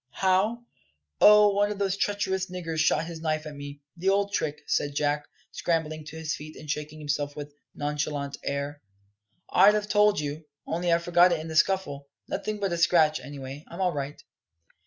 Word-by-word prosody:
"How? 200 +6 +1 0.5
Oh, 210 0 +8
one 205 +1 +2
of 210 - -4
those 195 -1 0
treacherous 190 -2 -1
niggers 165 -3 -4
shot 155 0 +2
his 165 -1 -8
knife 155 -1 -1
at 150 - -7
me 145 0 -9
the 180 +3 0
old 200 +1 +1
trick," 150 -6 -2
said 145 -1 -1
Jack, 145 0 0 0.2
scrambling 155 -2 -2
to 150 +1 -9
his 160 -1 -2
feet 155 +1 -10
and 155 - -11
shaking 150 +1 -4
himself 145 -1 -2
with 145 -1 -7 0.2
nonchalant 145 -1 -2
air, 140 +1 -3 0.7
"I'd 210 +1 +6
have 210 0 -2
told 210 0 +4
you, 150 +1 -4 0.2
only 170 +1 -1
I 170 - +5
forgot 175 +1 +4
it 170 - +1
in 160 +1 -7
the 160 - -5
scuffle, 155 -5 +1 0.2
Nothing 215 -1 -3
but 195 -3 -1
a 170 - -2
scratch, 155 -3 +4
anyway; 135 +1 -8
I'm 170 - -10
all 185 -2 +1
right." 145 0 -4
160 Hz, 185 wpm, -27 LUFS, 145-190 Hz, 0.7 s, Oh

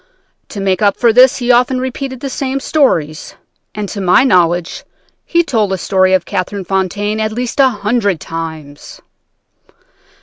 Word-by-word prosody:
To 205 - -7
make 195 -1 0
up 200 -2 +2
for 235 -2 +3
this 250 +2 +5
he 245 -1 +1
often 250 +1 +2
repeated 260 0 -5
the 275 - -4
same 270 0 -3
stories, 165 - -1 0.4
and 210 -1 -4
to 200 - -5
my 185 +6 +4
knowledge 175 -7 +1 0.4
he 340 0 +2
told 220 - 0
the 190 - -1
story 185 +1 +2
of 185 - -1
Catherine 195 0 -4
Fontaine 200 +3 -2
at 215 0 -1
least 245 +4 -4
a 270 -1 +6
hundred 205 -4 -1
times. 160 -3 -8
205 Hz, 160 wpm, -14 LUFS, 185-250 Hz, 0.4 s, a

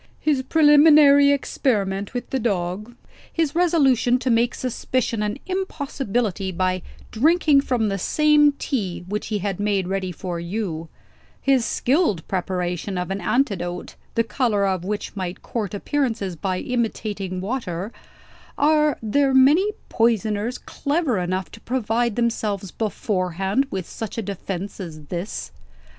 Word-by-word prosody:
"His 295 -4 +1
preliminary 295 -1 +6
experiment 205 -7 -1
with 245 0 -4
the 265 - 0
dog; 205 +1 -2 0.4
his 320 -4 0
resolution 280 -8 +3
to 255 0 -1
make 235 +1 +2
suspicion 255 -2 -1
an 210 +3 -1
impossibility, 270 - -2
by 185 0 0 0.3
drinking 300 +3 +4
from 245 -5 0
the 195 -1 -2
same 300 - +4
tea 200 - -3
which 210 +2 -3
he 215 - -1
had 195 -2 -2
made 200 -3 0
ready 190 -1 -2
for 175 0 -5
you; 170 -3 -4 0.5
his 265 -4 +2
skilled 255 - +1
preparation 180 0 -2
of 180 +1 -3
an 195 +1 -3
antidote, 180 -9 -1 0.2
the 230 - +3
color 225 -4 +1
of 190 -3 0
which 205 +3 -4
might 185 -2 -5
court 215 -5 -3
appearances 225 - -1
by 185 +3 -2
imitating 210 -6 -2
water 195 -2 -3 0.7
are 300 -1 +3
there 270 +5 +2
many 300 +11 +5 0.2
poisoners 225 0 +1
clever 285 - -1
enough 185 +1 -2
to 225 - -12
provide 235 -2 0
themselves 210 -5 -1
beforehand 195 +1 -1
with 190 -3 -4
such 225 0 -6
a 225 - -1
defence 195 0 -5
as 165 -5 -7
this? 170 - -4
220 Hz, 135 wpm, -23 LUFS, 190-265 Hz, 0.7 s, preliminary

